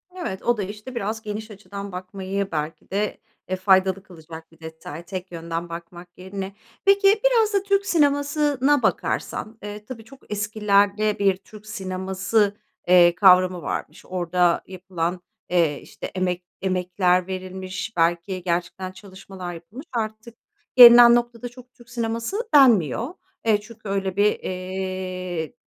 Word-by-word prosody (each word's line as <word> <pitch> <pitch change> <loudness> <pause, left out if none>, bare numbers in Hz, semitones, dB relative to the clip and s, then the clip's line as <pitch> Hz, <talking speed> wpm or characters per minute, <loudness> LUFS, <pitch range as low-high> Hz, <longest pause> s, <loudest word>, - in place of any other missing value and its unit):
Evet, 335 - -5
o 240 -1 +2
da, 205 - -2
işte, 210 +6 -8
biraz 220 -1 -3
geniş 215 0 -6
açıdan 200 0 -8
bakmayı 190 +2 -4
belki 155 0 -4
de, 205 +2 -1 0.3
e, 185 - -1
faydalı 190 0 +3
kılacak 165 -3 -12
bir 165 - -22
detay, 160 0 -9
tek 185 0 -7
yönden 170 0 -5
bakmak 175 +1 -10
yerine. 190 +1 -7 0.3
Peki, 400 +1 +5
biraz 455 -4 +3
da 395 -1 +2
Türk 395 0 +1
sinemasına 290 -3 +2
bakarsan, 220 +1 -2
eee, 210 0 -7
tabii 230 -2 -9
çok 265 -1 -17
eskilerde 210 0 +1
bir 195 -2 +3
Türk 215 +2 -15
sineması, 190 0 -1 0.3
eee, 175 -1 +6
kavramı 185 -2 +5
varmış. - - -5
Orada 180 -1 +1
yapılan, 180 -1 -4 0.3
eee, 165 -5 +1
işte, - - -9
emek 180 -1 -1 0.2
emekler 180 -1 +1
verilmiş, 185 +2 -5
belki 175 +2 0
gerçekten 180 +1 -2
çalışmalar 190 -2 -9
yapılmış. 190 - -11
Artık 220 0 -4 0.4
gelinen 240 -1 +10
noktada 240 0 -2
çok 250 +1 -16
Türk 240 0 -19
sineması 230 - -2
denmiyor. 240 - +4 0.3
E, 215 -2 +2
çünkü 220 -1 -11
öyle 195 -1 -1
bir, 205 +1 +2
eee, 185 -3 -4
195 Hz, 135 wpm, -23 LUFS, 180-225 Hz, 0.4 s, gelinen